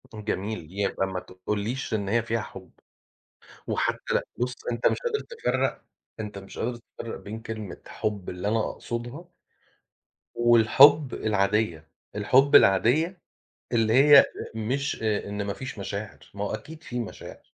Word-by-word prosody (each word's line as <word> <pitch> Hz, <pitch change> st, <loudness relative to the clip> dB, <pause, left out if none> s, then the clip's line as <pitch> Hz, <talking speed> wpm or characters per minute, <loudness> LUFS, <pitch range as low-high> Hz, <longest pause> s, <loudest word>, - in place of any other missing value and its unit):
يكون 110 Hz, -4 st, -10 dB
جميل، 105 Hz, -4 st, -3 dB
يبقى 95 Hz, 0 st, -1 dB
ما 95 Hz, -1 st, -3 dB
تقوليش 105 Hz, +8 st, -4 dB
إن 100 Hz, -2 st, -1 dB
هي 115 Hz, +2 st, +2 dB
فيها 115 Hz, 0 st, -1 dB
حُب، 95 Hz, -3 st, -11 dB, 1.0 s
وحتّى -, -, -1 dB
لأ -, -, +1 dB
بُصّ، 125 Hz, +1 st, -1 dB, 0.2 s
أنت 115 Hz, 0 st, -1 dB
مش -, -, +3 dB
قادر 470 Hz, -3 st, -1 dB
تفرّق 470 Hz, 0 st, -2 dB, 0.4 s
أنت 105 Hz, -2 st, -5 dB
مش 95 Hz, 0 st, -11 dB
قادر 120 Hz, +1 st, -2 dB
تفرّق 115 Hz, 0 st, -8 dB
بين 110 Hz, +2 st, -7 dB
كلمة 110 Hz, -4 st, -7 dB
حُب 105 Hz, -4 st, -3 dB
اللي 90 Hz, +3 st, -3 dB
أنا 115 Hz, +2 st, +2 dB
أقصدها 120 Hz, +9 st, -6 dB, 1.1 s
والحُب 120 Hz, +5 st, +6 dB
العادية، 100 Hz, -6 st, 0 dB, 0.3 s
الحُب 130 Hz, +7 st, +4 dB
العادية 145 Hz, -, +5 dB, 0.6 s
اللي 115 Hz, -2 st, +2 dB
هي 140 Hz, +2 st, +8 dB
أ -, -, +3 dB, 0.3 s
مش 125 Hz, +5 st, -2 dB
آآ 105 Hz, -2 st, 0 dB
إن 105 Hz, 0 st, -3 dB
ما 100 Hz, 0 st, -2 dB
فيش 130 Hz, +1 st, -7 dB
مشاعر، 100 Hz, +1 st, -6 dB
ما 100 Hz, 0 st, -3 dB
هو -, -, -3 dB
أكيد 155 Hz, +9 st, -9 dB
في 120 Hz, 0 st, -4 dB
مشاعر. 115 Hz, -, -8 dB
110 Hz, 150 wpm, -26 LUFS, 100-125 Hz, 1.1 s, هي